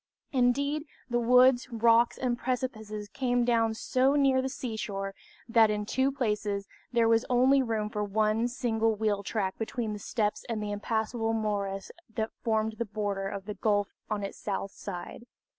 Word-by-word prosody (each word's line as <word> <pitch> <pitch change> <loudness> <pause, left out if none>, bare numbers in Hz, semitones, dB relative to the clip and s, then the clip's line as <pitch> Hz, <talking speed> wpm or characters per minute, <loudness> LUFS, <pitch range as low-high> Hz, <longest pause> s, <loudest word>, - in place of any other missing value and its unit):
Indeed, 280 +4 +1 0.3
the 240 - +2
woods, 250 +1 +5
rocks, 230 0 +4
and 250 -2 0
precipices 220 -5 -3
came 245 -2 +1
down 230 -2 +2
so 260 +4 +2
near 270 -2 +4
the 265 - -2
seashore, 210 -6 -4 0.3
that 230 -2 +5
in 210 0 -1
two 260 +5 +1
places 210 -6 -1 0.2
there 235 -1 +3
was 225 0 +4
only 260 +2 +5
room 225 -4 -1
for 210 -1 -2
one 215 +3 +1
single 225 -3 0
wheel 210 -1 0
track 195 -2 -2
between 225 -1 -2
the 210 - -6
steeps 210 0 -1
and 225 -2 -1
the 210 -1 -3
impassable 225 +2 -1
morass 200 -3 -2 0.2
that 220 0 -1
formed 220 -1 0
the 235 - 0
border 205 -2 -2
of 195 0 -5
the 210 - -4
gulf 205 -1 +1 0.2
on 210 -1 -2
its 195 - -6
south 195 -1 -3
side. 200 +5 -7
225 Hz, 165 wpm, -29 LUFS, 210-245 Hz, 0.3 s, woods